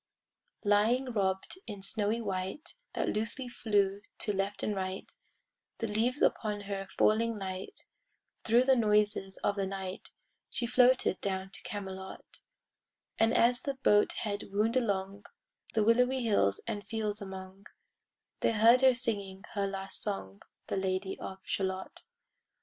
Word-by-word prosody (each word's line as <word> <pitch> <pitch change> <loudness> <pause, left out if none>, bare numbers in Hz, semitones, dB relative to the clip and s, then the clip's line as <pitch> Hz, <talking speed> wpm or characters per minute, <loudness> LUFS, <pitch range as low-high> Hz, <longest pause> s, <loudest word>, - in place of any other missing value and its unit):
Lying 225 +6 +3
robed 190 - -1
in 205 -3 -7
snowy 210 +2 +1
white 190 +6 -4 0.2
That - - 0
loosely 225 +4 -1
flew 205 -5 +1 0.2
to 210 - 0
left 195 +1 -2
and 210 - 0
right— 190 0 -4 0.6
The 225 - -2
leaves 230 +6 0
upon 210 -2 +1
her 195 -1 -4
falling 225 +1 +3
light— 190 -1 -6 0.6
Thro' 235 +2 +5
the 265 0 +5
noises 210 -4 +2
of 200 - +1
the 195 -1 0
night 190 +1 -6 0.4
She 240 - -2
floated 250 -4 +4
down 190 -1 -2
to - - -11
Camelot: 190 -2 -7 0.8
And 225 0 +4
as 245 +1 +4
the 275 0 -3
boat 210 -6 +4
head 205 -2 -3
wound 215 +4 +1
along 200 -4 -1 0.5
The 220 - +4
willowy 250 +3 +3
hills 100 - +2
and 205 - -3
fields 215 -2 -3
among, 190 0 -9 0.7
They - - +2
heard 230 +4 +6
her 260 -1 +6
singing 200 -6 -3
her 200 -1 0
last 195 0 -2
song, 100 - -4 0.2
The - - -2
Lady 190 0 -2
of 190 0 -7
Shalott. 190 -1 -3
205 Hz, 140 wpm, -31 LUFS, 195-230 Hz, 0.8 s, heard